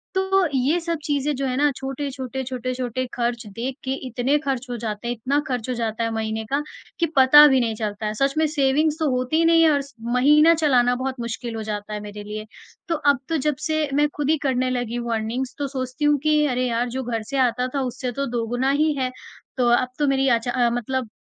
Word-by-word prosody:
तो 380 0 +2
ये 275 +7 +2
सब 335 0 -2
चीजें 290 0 0
जो 275 +1 -2
है 255 -1 -1
ना 295 +1 +4
छोटे-छोटे, 265 -1 -4
छोटे-छोटे 255 0 -3
ख़र्च 240 -1 -2
देख 255 +3 -3
के 265 - -3 0.2
इतने 255 +4 +1
ख़र्च 265 -2 -1
हो 245 - -3
जाते 220 0 -5
हैं 240 - 0
इतना 260 +5 0
ख़र्च 250 -2 -3
हो - - 0
जाता 230 -1 -2
है 230 - -1
महीने 220 0 -2
का 275 +6 -1 0.4
कि 340 - +3
पता 275 +3 +9
भी 265 -2 +4
नहीं 230 -3 0
चलता 215 -1 -4
है। 210 - -1
सच 275 +5 +1
में 315 - +3
सेविंग्स 295 +1 +1
तो 315 -2 +1
होती 255 +6 +1
नहीं 330 0 +5
है 320 - +6
और 285 -1 +2 0.3
महीना 300 +6 +6
चलाना 250 -6 +3
बहुत 260 0 -4
मुश्किल 235 0 -5
हो 220 - -4
जाता 210 0 -5
है 210 - -3
मेरे 205 0 -8
लिए। 215 +1 -6 0.4
तो 335 - 0
अब 285 -3 +2
तो 325 - +1
जब 300 0 0
से 310 -1 0
मैं 295 +1 +3
ख़ुद 295 -1 -1
ही 315 - +4
करने 255 -1 +1
लगी 245 -2 -2
हूँ 235 -1 -2
अर्निंग्स 230 +4 -3
तो 285 - -1
सोचती 260 +1 -3
हूँ 295 0 +4
कि 305 -1 +3
अरे 255 -1 0
यार 240 +1 -1
जो 260 +2 -4
घर 230 -2 -3
से 275 - -2
आता 250 +1 -1
था 275 - +1
उससे 255 0 -3
तो 275 +4 -2
दोगुना 245 +3 0
ही 305 +2 +2
है, 255 -1 -1 0.5
तो 250 -1 +2
अब 245 +1 +3
तो 295 - +2
मेरी 270 0 +2
अच्छा 235 0 +1
अ, 245 -1 +2
मतलब 245 +1 -2
255 Hz, 230 wpm, -23 LUFS, 235-285 Hz, 0.5 s, पता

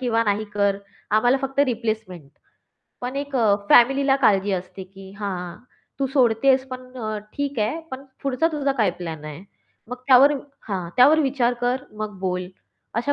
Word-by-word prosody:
किंवा 230 -3 +1
"नाही 210 0 0
कर. 200 -1 +2 0.3
आम्हाला 245 +5 +3
फक्त 270 +1 -1
रिप्लेसमेंट" 220 - -4 0.7
पण 250 +2 -4
एक 285 -1 -3
अ, 220 -5 +4 0.2
फॅमिलीला 270 +3 +5
काळजी 200 -1 +3
असते, 185 +1 -5
की 190 0 -14
"हां, 180 -4 -4 0.4
तू 270 - +2
सोडतेस 260 0 +3
पण 255 0 -6 0.2
अ, 215 -3 -3 0.2
ठीक 285 -3 -3
आहे 215 +9 0
पण 265 +1 -7 0.2
पुढचा 275 +3 +1
तुझा 280 -2 0
काय 215 -8 +1
प्लॅन 160 -3 -6
आहे. 155 +3 -8 0.5
मग 250 - -5
त्यावर 270 +2 +7 0.4
हां. 185 -4 -3
त्यावर 285 +5 +6
विचार 260 -4 +1
कर. 250 +2 0
मग 210 -3 -5
बोल." 180 -1 -2 0.5
अशा 240 +5 0
230 Hz, 160 wpm, -23 LUFS, 195-270 Hz, 0.7 s, त्यावर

